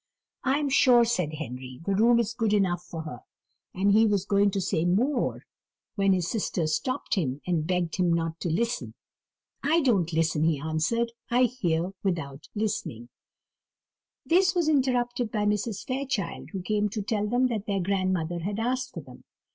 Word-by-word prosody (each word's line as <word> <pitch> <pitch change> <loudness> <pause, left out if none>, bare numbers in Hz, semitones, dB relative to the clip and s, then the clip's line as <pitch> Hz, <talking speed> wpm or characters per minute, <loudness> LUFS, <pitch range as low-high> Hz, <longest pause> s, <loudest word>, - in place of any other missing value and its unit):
"I 270 +1 +2
am 295 -1 -1
sure," 245 -3 +5
said 180 -10 -1
Henry, 130 -3 -7
"the 200 - +1
room 230 +4 +4
is 230 -1 0
good 225 -3 0
enough 180 -4 +1
for 165 -2 -7
her:" 150 -6 -7 0.5
and 195 +2 +1
he 220 +2 +5
was 200 -2 +1
going 200 0 +3
to 195 - -2
say 170 -3 0
more, 235 +10 +1 0.5
when 195 -2 +2
his 180 -3 0
sisters 170 -7 -1
stopped 255 - -2
him, 145 - 0
and 165 -3 0
begged 180 -2 -1
him 180 -2 +2
not 165 -1 -1
to 175 - -2
listen. 235 +9 -1 0.7
"I 320 +4 +3
don't 200 - +2
listen," 160 -1 +1
he 160 -3 +2
answered; 160 +11 0 0.2
"I 245 +2 +4
hear 185 -8 0
without 155 -7 -3
listening." 125 - -3 1.2
They 350 +3 +5
were 345 -3 +1
interrupted 250 -5 +1
by 210 -2 0
Mrs. 210 0 -1
Fairchild, 260 -4 -3
who 190 -3 -5
came 210 +1 0
to 210 0 -4
tell 210 0 -1
them 245 +4 +2
that 215 -4 -3
their 200 -2 0
grandmother 185 -3 0
had 200 +4 -3
asked 255 +3 -2
for - - -5
them. - - -15
200 Hz, 175 wpm, -27 LUFS, 170-235 Hz, 1.2 s, sure